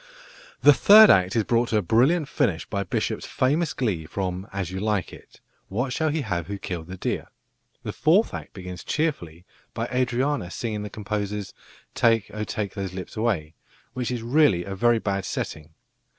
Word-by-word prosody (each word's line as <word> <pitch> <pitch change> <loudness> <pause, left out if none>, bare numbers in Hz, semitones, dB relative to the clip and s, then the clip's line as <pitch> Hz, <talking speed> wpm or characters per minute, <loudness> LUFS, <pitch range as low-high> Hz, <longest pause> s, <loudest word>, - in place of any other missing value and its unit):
The 145 - +9
third 215 +7 +8
act 95 +1 +3
is 115 - +3
brought 120 +2 +1
to 110 - +2
a 105 - +1
brilliant 135 - +3
finish 110 - 0
by 100 - -3
Bishop's 95 - -2
famous 150 +6 +1
glee 95 - -2
from 95 +1 -4
As 95 -3 -4
You 95 - -4
Like 105 -2 -1
It, - - -16 0.3
"What 120 +6 -2
shall 160 +2 0
he 155 +1 -1
have 95 - -3
who 100 0 -4
killed 85 -4 -6
the 95 +1 -8
deer?" - - -3 0.6
The - - -4
fourth 185 +9 +3
act - - -7
begins 90 -2 -8
cheerfully 90 - -2 0.3
by 115 - -1
Adriana 125 -3 0
singing 105 +1 -4
the 105 - -5
composer's 105 -1 -4 0.4
"Take, 115 -3 +2
oh 105 0 -3
take 105 -3 -4
those 95 -3 -5
lips 95 +4 -7
away," 100 -9 -1 0.4
which 125 -2 -3
is 120 -2 -3
really 120 - +3
a 95 - -6
very 120 +4 +3
bad 100 -3 -2
setting. 75 -2 -5
105 Hz, 180 wpm, -25 LUFS, 95-125 Hz, 0.6 s, The